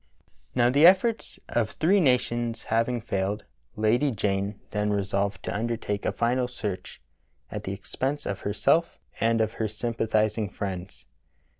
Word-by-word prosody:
Now 120 0 +4
the 145 +5 +7
efforts 205 +5 +3
of 115 -3 0
three 190 +6 +3
nations 120 -4 +1
having 115 +1 +1
failed. 100 0 -2 0.3
Lady 115 +7 +2
Jane 100 -3 -1
then 105 0 0
resolved 100 -1 -1
to - - -3
undertake 110 -2 -2
a - - +2
final 125 +2 +1
search 105 -6 -5 0.5
at - - -5
the 95 - -3
expense 135 +8 -3
of 100 - -3
herself 105 +12 +1 0.2
and 115 0 +3
of 110 - 0
her 110 - +2
sympathizing 110 -1 0
friends. 95 -2 -6
110 Hz, 140 wpm, -27 LUFS, 100-125 Hz, 0.5 s, the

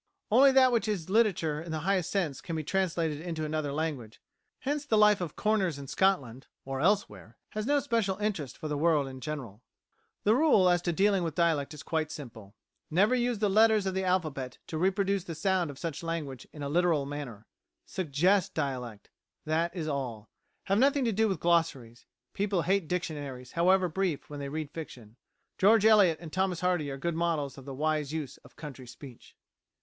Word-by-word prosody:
Only 270 +5 +7
that 260 -1 +6
which 235 -2 +1
is 185 -5 -3
literature 180 -9 +2
in 165 0 -7
the 155 -1 -3
highest 185 0 0
sense 175 -9 -1
can 170 -4 -5
be 155 - -2
translated 165 -3 -1
into 165 -2 -4
another 155 -2 -2
language; 140 -8 -4 0.4
hence 290 +2 -1
the 230 -7 +1
life 210 -2 +5
of 170 -4 -4
corners 200 -7 +1
in 140 - -8
Scotland, 135 -7 0 0.2
or 135 0 -3
elsewhere, 190 - 0
has 215 +1 -4
no 290 0 +3
special 230 -8 0
interest 195 -10 -3
for 155 - -5
the 150 -1 -2
world 155 -3 +2
in 130 -1 -9
general. 130 -9 -6 0.6
The 210 - +4
rule 240 - +4
as 175 -1 +3
to 175 - -1
dealing 195 +2 +2
with 165 -3 -3
dialect 165 -5 +1
is 145 - -10
quite 160 -2 -1
simple. 115 -9 -10 0.3
Never 195 +9 +3
use 245 -2 +1
the 210 0 +1
letters 215 0 +4
of 190 - -1
the 190 0 -1
alphabet 155 -9 -1
to 160 - -5
reproduce 195 +1 +1
the 165 - -6
sound 180 0 0
of 140 - -9
such 165 -1 -5
language 155 -7 -5
in 150 - -8
a - - -2
literal 165 -1 +2
manner. 140 -7 -7 0.4
Suggest 180 +3 +1
dialect; 125 -8 -4 0.3
that 160 +2 +1
is 165 -3 -3
all. 125 -7 -4 0.3
Have 195 +2 +1
nothing 275 +1 +3
to 230 - +2
do 220 +2 +2
with 190 -6 -2
glossaries. 145 -9 0 0.3
People 195 -4 0
hate 190 0 +1
dictionaries, 145 -7 -4
however 185 +2 +3
brief, 175 -4 -2
when 145 - -6
they 140 -1 -4
read 155 0 -4
fiction. 120 -9 -9 0.4
George 215 +2 +5
Eliot 205 -7 +6
and 160 -2 -10
Thomas 185 -2 0
Hardy 180 -5 0
are 135 - -5
good 170 +5 -2
models 160 -5 -1
of 135 - -12
the 135 -1 -7
wise 150 0 -1
use 150 -4 -5
of - - -20
county 135 -5 -9
speech. 125 0 -13
165 Hz, 195 wpm, -29 LUFS, 145-195 Hz, 0.6 s, Only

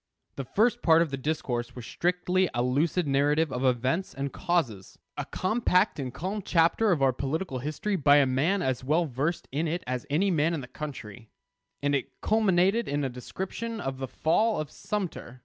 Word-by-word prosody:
The 135 - -5
first 235 - +2
part 165 0 +5
of 160 - -6
the - - -1
discourse 130 -4 -3
was 125 -2 -8
strictly 180 +3 0
a 120 - +1
lucid 155 +7 +1
narrative 145 +2 +2
of 125 - -2
events 130 +8 0
and 140 0 -3
causes: 120 - -1 0.2
a - - -4
compact 185 -3 +1
and 130 -2 -3
calm 190 - -4
chapter 180 +5 +3
of 150 -6 +2
our 130 -1 +4
political 140 +2 -3
history 155 +9 -2
by 145 -2 +5
a 145 -1 +6
man 155 +10 +1
as 130 -1 -1
well 155 +6 +2
versed 150 +5 -2
in 155 +5 -1
it 170 +3 -2
as 125 -1 -4
any 185 +7 +2
man 165 0 +2
in 150 - -4
the 125 - -8
country; 120 -5 -8 0.5
and 145 0 +2
it 140 - -3
culminated 205 0 +2
in 145 +1 -1
a 135 - 0
description 190 - -5
of 135 -6 -4
the 135 - -3
fall 210 - +1
of 155 -1 -4
Sumter. 180 -11 -5
150 Hz, 190 wpm, -28 LUFS, 130-180 Hz, 0.5 s, a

